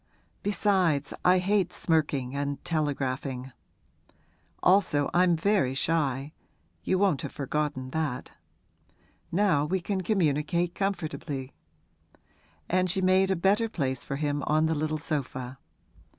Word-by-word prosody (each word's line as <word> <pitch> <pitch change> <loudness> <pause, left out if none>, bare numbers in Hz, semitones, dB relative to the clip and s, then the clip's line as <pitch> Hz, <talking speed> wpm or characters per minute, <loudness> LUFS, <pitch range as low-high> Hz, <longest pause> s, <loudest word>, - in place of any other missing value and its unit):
Besides, 185 -8 +1
I 180 +1 +5
hate 190 0 +1
smirking 145 -7 0
and 140 0 -3
telegraphing. 135 -4 -2 1.1
Also 180 -7 +3
I'm 175 -1 +4
very 165 -7 +1
shy 140 -1 0 0.5
you 185 - +1
won't 190 -8 +2
have - - -5
forgotten 140 -2 -2
that. 150 -5 -2 1.0
Now 175 -6 +3
we 185 +5 0
can 190 +2 -2
communicate 170 -2 +1
comfortably.' 155 -8 -3 1.1
And 185 +1 +1
she 190 +2 0
made 190 +1 +4
a 190 - +2
better 200 +6 +2
place 130 - -2
for 140 - -4
him 145 0 -1
on 155 +1 +3
the 160 - +1
little 155 0 -1
sofa. 130 -3 -4
155 Hz, 120 wpm, -28 LUFS, 140-185 Hz, 1.1 s, I